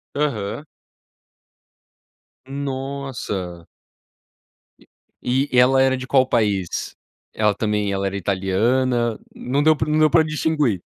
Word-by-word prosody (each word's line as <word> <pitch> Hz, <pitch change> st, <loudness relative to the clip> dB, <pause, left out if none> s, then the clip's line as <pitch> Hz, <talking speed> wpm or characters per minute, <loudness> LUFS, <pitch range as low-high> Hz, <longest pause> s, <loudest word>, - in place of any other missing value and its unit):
Aham. 140 Hz, -2 st, -2 dB, 1.8 s
Nossa. 135 Hz, -10 st, -5 dB, 1.6 s
E 130 Hz, +3 st, 0 dB
e 125 Hz, -, +1 dB
ela 130 Hz, +1 st, +5 dB
era 130 Hz, 0 st, +3 dB
de 130 Hz, +1 st, -7 dB
qual 130 Hz, -1 st, +3 dB
país? 100 Hz, -7 st, -1 dB, 0.4 s
Ela 105 Hz, -1 st, +2 dB
também 105 Hz, -2 st, -1 dB
ela 100 Hz, 0 st, -1 dB
era 100 Hz, -, -4 dB
italiana 115 Hz, +6 st, 0 dB, 0.2 s
não 135 Hz, +3 st, -1 dB
deu 155 Hz, 0 st, +5 dB
para 145 Hz, +1 st, -2 dB
não 155 Hz, +1 st, +2 dB
deu 155 Hz, -1 st, +5 dB
para 160 Hz, +1 st, +5 dB
distinguir. 150 Hz, -, 0 dB
125 Hz, 115 wpm, -21 LUFS, 105-140 Hz, 1.8 s, ela